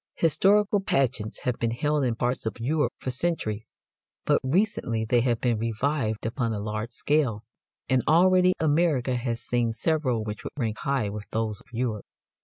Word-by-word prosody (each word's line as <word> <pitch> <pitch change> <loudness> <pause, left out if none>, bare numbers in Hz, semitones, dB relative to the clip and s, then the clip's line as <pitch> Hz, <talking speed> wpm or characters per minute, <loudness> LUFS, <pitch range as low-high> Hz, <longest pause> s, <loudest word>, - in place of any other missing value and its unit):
Historical 200 +5 +3
pageants 125 - 0
have 125 -2 -2
been 115 - +1
held 145 +5 0
in 120 -3 0
parts 120 -1 -1
of 110 - -4
Europe 150 +6 +1
for 130 - -4
centuries, 115 -7 -2 0.5
but - - +3
recently 130 - 0
they 120 +2 +3
have 120 -2 +1
been 120 -3 +1
revived 115 0 -1
upon 115 0 -1
a 105 - -2
large 110 +2 -3
scale, 125 -4 0 0.4
and 130 -1 +3
already 185 +3 +5
America 150 -5 +2
has 120 -1 -3
seen 120 -2 0
several 130 -3 0
which 105 +1 -6
would - - -6
rank 110 -5 -2
high 135 -6 0
with 105 +1 -6
those 110 -2 -2
of - - -23
Europe. 115 -3 -3
125 Hz, 170 wpm, -26 LUFS, 110-150 Hz, 0.5 s, already